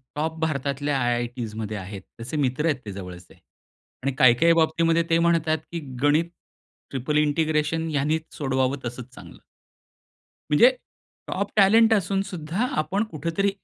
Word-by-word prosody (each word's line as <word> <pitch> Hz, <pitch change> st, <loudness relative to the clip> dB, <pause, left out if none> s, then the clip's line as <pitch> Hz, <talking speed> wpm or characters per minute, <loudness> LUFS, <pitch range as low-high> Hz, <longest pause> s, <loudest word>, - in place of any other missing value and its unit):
Top 160 Hz, +2 st, -2 dB
भारतातल्या 145 Hz, -2 st, -1 dB
आय-आय-टीजमध्ये 120 Hz, -3 st, -2 dB
आहेत, 95 Hz, +1 st, -7 dB, 0.2 s
त्याचे 120 Hz, +6 st, -5 dB
मित्र 140 Hz, +1 st, 0 dB
आहेत 155 Hz, -5 st, +1 dB
ते 105 Hz, -, -5 dB
जवळचे. 90 Hz, -2 st, -10 dB, 0.7 s
आणि 140 Hz, -, +1 dB
काही 130 Hz, -2 st, +6 dB
काही 170 Hz, 0 st, +5 dB
बाबतीमध्ये 165 Hz, +1 st, +2 dB
ते 165 Hz, 0 st, +3 dB
म्हणतात, 165 Hz, -2 st, +2 dB
की 170 Hz, -, -3 dB, 0.2 s
गणित 155 Hz, +4 st, +3 dB, 0.6 s
ट्रिपल 135 Hz, +3 st, -2 dB
इंटिग्रेशन 155 Hz, +1 st, +1 dB
ह्यांनीच 155 Hz, +2 st, 0 dB
सोडवावं 130 Hz, -1 st, 0 dB
तसंच 125 Hz, +1 st, -7 dB
चांगलं. -, -, -13 dB, 1.1 s
म्हणजे 150 Hz, +12 st, +7 dB, 0.6 s
टॉप 200 Hz, +1 st, -3 dB
टॅलेंट 220 Hz, +3 st, +6 dB
असूनसुद्धा, 195 Hz, 0 st, -1 dB
आपण 160 Hz, +8 st, 0 dB
कुठेतरी 170 Hz, +6 st, -1 dB
150 Hz, 130 wpm, -24 LUFS, 130-165 Hz, 1.1 s, म्हणजे